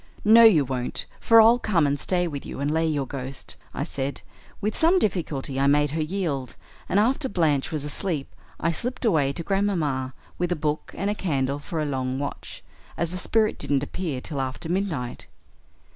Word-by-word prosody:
"'No, 225 +2 +8
you 175 -11 +7
won't, 125 -1 -3
for 230 0 +6
I'll 230 +2 +7
come 180 -10 +2
and 140 0 0
stay 180 +2 +1
with 145 -4 -5
you - - -7
and 140 +1 0
lay 160 +1 +1
your 145 -3 0
ghost,' 130 0 -7 0.2
I - - -3
said. 135 0 -3 0.4
With 210 +1 -2
some 335 +3 +4
difficulty 150 - -1
I 140 - +3
made 145 0 +3
her 160 +1 -1
yield, 155 -7 -2 0.3
and 200 - +3
after 265 +5 +1
Blanche 155 -8 +1
was 150 -3 -3
asleep 150 -1 -2 0.3
I 170 - +1
slipped 245 +9 -2
away 155 -10 +3
to 165 - -5
Grandmamma, 160 -10 0 0.2
with 175 0 0
a - - +2
book 150 -1 -2
and 205 +2 -1
candle 140 -5 0
for 160 +2 -5
a 155 - 0
long 130 -2 -2
watch, 140 +1 -6 0.3
as 170 0 -1
the 180 - -4
spirit 220 +3 +1
didn't 140 -1 0
appear 145 -4 -4
till 140 -1 -4
after 130 +4 -4
midnight. 170 -10 -2
155 Hz, 190 wpm, -25 LUFS, 140-195 Hz, 0.4 s, No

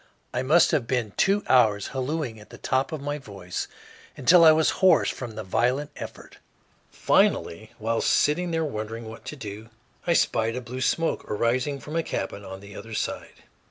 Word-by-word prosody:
I 125 - 0
must 155 +7 +4
have 145 -8 0
been 125 -5 -1
two 200 +1 +2
hours 110 -5 +3
hallooing 130 -3 -3
at 105 - -15
the - - -11
top 130 +3 0
of 155 -3 -4
my 145 +1 -3
voice, 100 -7 -6 0.5
until 170 +7 +6
I 160 - +9
was 155 0 +3
hoarse 185 -4 +5
from 120 -4 -7
the 110 - -5
violent 125 +9 0
effort. - - -10 0.5
Finally, 110 +6 +1
while 115 +1 -1
sitting 175 +4 +2
there 165 -1 0
wondering 115 -3 -5
what 115 +1 -10
to 140 - -6
do, 110 -3 -8 0.4
I 170 - +4
spied 115 -7 +1
a 125 - -3
blue 125 +1 -7
smoke 165 +5 0
arising 125 +6 0
from 150 +4 -8
a 165 - +2
cabin 100 -8 -4
on 95 0 -8
the 100 0 -12
other 115 -1 -8
side. - - -4
125 Hz, 185 wpm, -25 LUFS, 110-150 Hz, 0.5 s, I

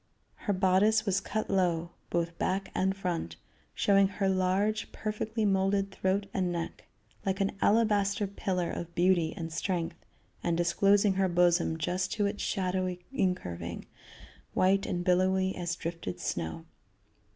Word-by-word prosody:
Her 205 - -2
bodice 195 +4 +3
was 200 -1 +1
cut 215 +2 -2
low, 175 -3 +1 0.2
both 170 0 -1
back 195 +1 -1
and 190 +1 0
front, 170 - -3 0.4
showing 195 -1 +4
her 195 0 -1
large 190 +3 +1
perfectly 215 +1 -2
molded 195 0 +2
throat 190 +1 0
and 185 -2 0
neck, 170 -1 -5 0.4
like 190 0 -1
an 195 0 +1
alabaster 205 -2 +3
pillar 185 -3 -2
of 170 0 -6
beauty 175 -2 +3
and 165 -1 -5
strength, 170 0 -2 0.4
and 170 -1 +1
disclosing 195 +4 +3
her 190 0 +1
bosom 175 -2 +3
just 180 +4 -1
to 210 -3 +1
its 200 +1 -2
shadowy 185 -1 -1
incurving, 180 - -2 0.7
white 195 +1 +3
and 175 0 -2
billowy 190 +1 +2
as 175 -1 -2
drifted 165 - -5
snow. 80 -6 -3
185 Hz, 140 wpm, -30 LUFS, 175-195 Hz, 0.7 s, showing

